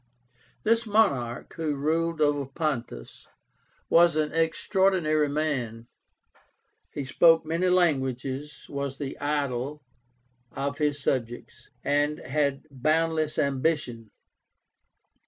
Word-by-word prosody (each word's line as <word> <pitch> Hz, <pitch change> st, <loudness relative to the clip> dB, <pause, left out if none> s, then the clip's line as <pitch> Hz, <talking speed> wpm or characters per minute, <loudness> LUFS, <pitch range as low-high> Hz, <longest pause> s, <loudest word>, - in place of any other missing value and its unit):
This 230 Hz, +1 st, +2 dB
monarch, 140 Hz, -, +1 dB
who 155 Hz, -3 st, -1 dB
ruled 165 Hz, +3 st, -1 dB
over 145 Hz, -2 st, +2 dB
Pontus, 135 Hz, -, -4 dB, 0.6 s
was 170 Hz, -1 st, +5 dB
an 155 Hz, -1 st, 0 dB
extraordinary 165 Hz, -2 st, +2 dB
man. 135 Hz, -7 st, -2 dB, 1.1 s
He 140 Hz, -, -5 dB
spoke 165 Hz, +4 st, +4 dB
many 165 Hz, +3 st, 0 dB
languages, 140 Hz, -4 st, 0 dB
was 140 Hz, -1 st, -4 dB
the 140 Hz, -2 st, -5 dB
idol, 145 Hz, -1 st, -2 dB, 0.7 s
of 140 Hz, +1 st, -3 dB
his 145 Hz, -1 st, +1 dB
subjects, 120 Hz, -2 st, -3 dB
and 145 Hz, +1 st, +1 dB
had 140 Hz, 0 st, -1 dB
boundless 155 Hz, +3 st, 0 dB
ambition. 135 Hz, -5 st, -1 dB
145 Hz, 95 wpm, -27 LUFS, 135-160 Hz, 1.1 s, was